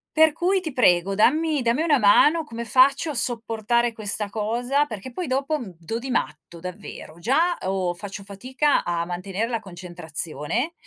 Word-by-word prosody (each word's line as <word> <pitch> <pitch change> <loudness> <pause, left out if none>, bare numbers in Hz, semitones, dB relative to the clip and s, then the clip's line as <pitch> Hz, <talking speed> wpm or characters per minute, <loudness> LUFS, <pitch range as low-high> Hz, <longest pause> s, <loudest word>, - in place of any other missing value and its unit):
Per 315 -1 +5
cui, 370 +4 +1
ti 320 -5 -5
prego, 190 -6 +3
dammi 300 +8 +2
dammi 240 +5 +1
una 300 -5 +3
mano, 295 +10 +5
come 235 -5 -7
faccio 275 +6 +4
a - - -5
sopportare 235 -1 -1
questa 210 -1 -2
cosa? 240 +7 0
Perché 220 +1 -7
poi, 345 +7 -4
dopo, 275 +4 -1
mhmm, 195 -8 -9
do 175 +8 -4
di 265 +2 -7
matto, 170 -7 -3
davvero. 180 -2 -9
Già 320 - +2
o 185 -2 -1
faccio 200 +2 -8
fatica 255 +9 0
a 170 -1 -1
mantenere 185 +5 -3
la 230 -2 -2
concentrazione, 175 - -4
230 Hz, 165 wpm, -23 LUFS, 190-275 Hz, -, Per